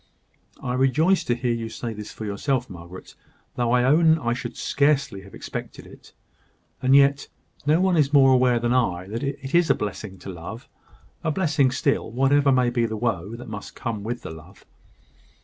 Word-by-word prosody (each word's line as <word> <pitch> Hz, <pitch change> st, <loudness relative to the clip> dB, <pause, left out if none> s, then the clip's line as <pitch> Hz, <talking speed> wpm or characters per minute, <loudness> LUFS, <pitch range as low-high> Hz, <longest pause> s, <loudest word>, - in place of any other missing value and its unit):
"I 125 Hz, -, -2 dB
rejoice 150 Hz, +9 st, +2 dB
to 120 Hz, -, +1 dB
hear 120 Hz, 0 st, -1 dB
you 115 Hz, -1 st, -4 dB
say 115 Hz, +1 st, -5 dB
this 105 Hz, -1 st, -8 dB
for 110 Hz, -, -7 dB
yourself, 120 Hz, +4 st, -2 dB
Margaret; 90 Hz, +1 st, -11 dB, 0.4 s
though 120 Hz, -1 st, 0 dB
I 125 Hz, 0 st, +3 dB
own 160 Hz, +4 st, +5 dB
I 120 Hz, -6 st, -1 dB
should 125 Hz, -, -6 dB
scarcely 140 Hz, -8 st, +1 dB
have 100 Hz, 0 st, -14 dB
expected -, -, -7 dB
it. -, -, -16 dB, 0.7 s
And 130 Hz, +1 st, +4 dB
yet 140 Hz, 0 st, +4 dB, 0.4 s
no 155 Hz, +3 st, +4 dB
one 185 Hz, -1 st, +2 dB
is 145 Hz, -3 st, +2 dB
more 135 Hz, -2 st, +6 dB
aware 125 Hz, -1 st, +4 dB
than 120 Hz, +1 st, 0 dB
I 95 Hz, -8 st, 0 dB
that 115 Hz, +3 st, -4 dB
it 135 Hz, -1 st, -5 dB
is 170 Hz, -1 st, +4 dB
a -, -, +5 dB
blessing 100 Hz, -1 st, -5 dB
to 100 Hz, -, -10 dB
love 95 Hz, +7 st, -9 dB, 0.6 s
a 165 Hz, -, 0 dB
blessing 155 Hz, -5 st, +2 dB
still, 140 Hz, +2 st, 0 dB
whatever 135 Hz, +3 st, +3 dB
may 125 Hz, -2 st, +3 dB
be 120 Hz, -1 st, +1 dB
the 110 Hz, 0 st, -4 dB
woe 105 Hz, -2 st, -2 dB
that 120 Hz, -, -10 dB
must 105 Hz, -2 st, -8 dB
come 115 Hz, -3 st, -4 dB
with 120 Hz, +4 st, -5 dB
the -, -, -6 dB
love. 80 Hz, +4 st, -14 dB
125 Hz, 190 wpm, -24 LUFS, 110-140 Hz, 0.7 s, more